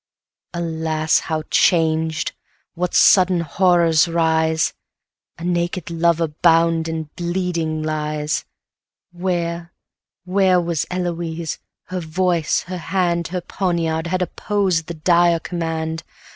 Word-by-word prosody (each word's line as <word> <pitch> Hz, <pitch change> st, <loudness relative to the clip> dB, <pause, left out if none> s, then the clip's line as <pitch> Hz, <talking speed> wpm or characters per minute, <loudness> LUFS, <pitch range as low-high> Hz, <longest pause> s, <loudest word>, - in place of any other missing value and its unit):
Alas, 160 Hz, -2 st, 0 dB
how 155 Hz, -1 st, -3 dB
changed! 160 Hz, -2 st, +2 dB, 0.4 s
what 180 Hz, 0 st, -2 dB
sudden 185 Hz, -3 st, +5 dB
horrors 170 Hz, -1 st, +3 dB
rise! 160 Hz, -1 st, +1 dB, 0.6 s
A 165 Hz, -, -10 dB
naked 175 Hz, -1 st, -2 dB
lover 170 Hz, 0 st, +2 dB
bound 165 Hz, -1 st, +4 dB
and 160 Hz, -2 st, -5 dB
bleeding 170 Hz, -3 st, -2 dB
lies! 150 Hz, -1 st, -2 dB, 0.7 s
100 175 Hz, +1 st, -13 dB
Where, 170 Hz, -2 st, -2 dB, 0.5 s
where 185 Hz, -1 st, +3 dB
was 170 Hz, -3 st, -1 dB
Eloise? 170 Hz, -3 st, -3 dB, 0.2 s
her 185 Hz, 0 st, -5 dB
voice, 170 Hz, 0 st, 0 dB
her 180 Hz, 0 st, -6 dB
hand, 170 Hz, -1 st, 0 dB
Her 180 Hz, +1 st, -3 dB
poniard, 170 Hz, -3 st, -1 dB
had 185 Hz, +1 st, 0 dB
opposed 185 Hz, -2 st, -1 dB
the 170 Hz, -, -5 dB
dire 170 Hz, +1 st, +3 dB
command. 165 Hz, -1 st, -3 dB
170 Hz, 110 wpm, -20 LUFS, 160-180 Hz, 0.7 s, sudden